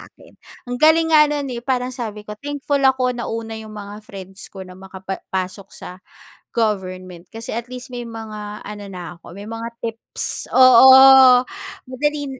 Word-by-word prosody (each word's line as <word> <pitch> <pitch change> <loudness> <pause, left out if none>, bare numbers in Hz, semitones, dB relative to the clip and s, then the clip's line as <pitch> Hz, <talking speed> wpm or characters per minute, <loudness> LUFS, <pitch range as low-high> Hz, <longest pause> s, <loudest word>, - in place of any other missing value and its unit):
akin. - - -20 0.3
Ang 245 0 -6
galing 325 +1 +4
nga 300 -1 +6
no'n, 290 -3 -3
eh. 235 - -5
Parang 250 0 -2
sabi 215 -5 -7
ko, 210 - -8
"Thankful 285 0 -2
ako 260 -2 +2
nauna 230 -2 -5
'yong 220 - -11
mga 205 0 -9
friends 195 -1 -10
ko 190 -1 -10
na 185 - -13
makapa 190 0 -8
pasok 190 +1 -4
sa 180 +1 -11 0.5
government 185 -5 -3
kasi 225 0 -7
at 235 +1 -5
least 250 0 -8
may 245 0 -5
mga 215 -2 -8
ano 205 0 -8
na 175 -2 -8
ako 170 - -15
may 200 +4 -10
mga 225 +1 -6
tips." 230 -1 -4
Oo. 260 0 +8 0.4
Madaling 285 0 -3
230 Hz, 165 wpm, -20 LUFS, 200-260 Hz, 0.5 s, Oo